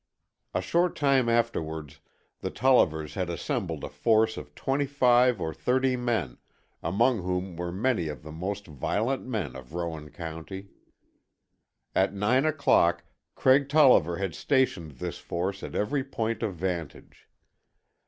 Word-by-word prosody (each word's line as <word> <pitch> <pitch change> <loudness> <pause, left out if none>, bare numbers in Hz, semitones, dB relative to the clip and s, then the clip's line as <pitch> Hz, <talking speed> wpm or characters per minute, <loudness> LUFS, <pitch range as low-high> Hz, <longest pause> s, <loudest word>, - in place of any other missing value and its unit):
A 90 - +1
short 170 - +1
time 135 -4 +3
afterwards 80 -11 -1 0.4
the - - -3
Tollivers 80 - +2
had 90 -3 -2
assembled 85 - -3
a - - -4
force 110 -1 +2
of - - -9
twenty 140 +1 0
five 125 -4 +4
or 80 -2 -3
thirty 130 +1 +1
men, 115 - -2 0.4
among 115 +5 +2
whom 90 0 -3
were 85 +1 -4
many 100 -2 0
of 75 -5 -6
the 80 - -9
most 100 +6 -4
violent 110 - -2
men 110 - -3
of 65 +4 -10
Rowan 80 -3 -4
County. 85 +5 -7 1.2
At 95 +1 +2
nine 125 +8 +2
o'clock 85 - +3 0.3
Craig 135 +1 +4
Tolliver 130 - +5
had 95 -4 -2
stationed 100 - 0
this 65 - -6
force 95 +3 -3
at - - -7
every 135 +6 0
point 115 -4 -3
of 100 - -2
vantage. 85 -3 -5
100 Hz, 140 wpm, -27 LUFS, 85-125 Hz, 1.2 s, Tolliver